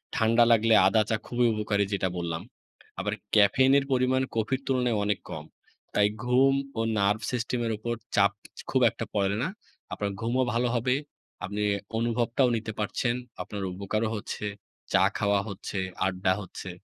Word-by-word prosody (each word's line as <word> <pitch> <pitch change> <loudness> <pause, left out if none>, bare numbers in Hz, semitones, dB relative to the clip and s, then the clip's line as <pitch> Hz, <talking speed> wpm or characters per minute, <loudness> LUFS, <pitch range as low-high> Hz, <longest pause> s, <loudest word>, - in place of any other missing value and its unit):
ঠান্ডা 115 +1 +4
লাগলে 115 0 +4
আদা 110 +3 +4
চা 110 - +2
খুবই 120 0 +1
উপকারী 105 -1 0
যেটা 95 -1 0
বললাম। 85 -2 -3 0.6
আবার - - -1 0.2
ক্যাফেইনের 130 +7 +5
পরিমাণ 130 0 +2
কফির 115 +4 0
তুলনায় 125 -4 +1
অনেক 105 0 0
কম। - - -6 0.5
তাই 105 - +4 0.2
ঘুম 130 +2 +4 0.2
ও - - +2 0.2
Nerve 100 +2 +2
system 125 0 -1
এর 115 - -1
উপর 120 +2 -3 0.2
চাপ 100 -1 +5 0.4
খুব - - +2
একটা - - -6
পড়ে 100 0 +1
না। - - 0 0.5
আপনার 100 -1 -2
ঘুমও 120 +3 +1
ভালো 120 +1 +1
হবে। 125 +2 +2 0.5
আপনি 100 +1 -3 0.3
অনুভবটাও 120 +2 +1
নিতে 110 0 -5
পারছেন। 120 +3 0 0.3
আপনার 100 -2 -5
উপকারও 110 +4 -1
হচ্ছে, 105 0 -5 0.5
চা - - +5
খাওয়া 100 -1 +2
হচ্ছে, 100 0 -5 0.3
আড্ডা 95 0 +1
হচ্ছে। 95 0 -8
110 Hz, 155 wpm, -27 LUFS, 100-125 Hz, 0.6 s, ক্যাফেইনের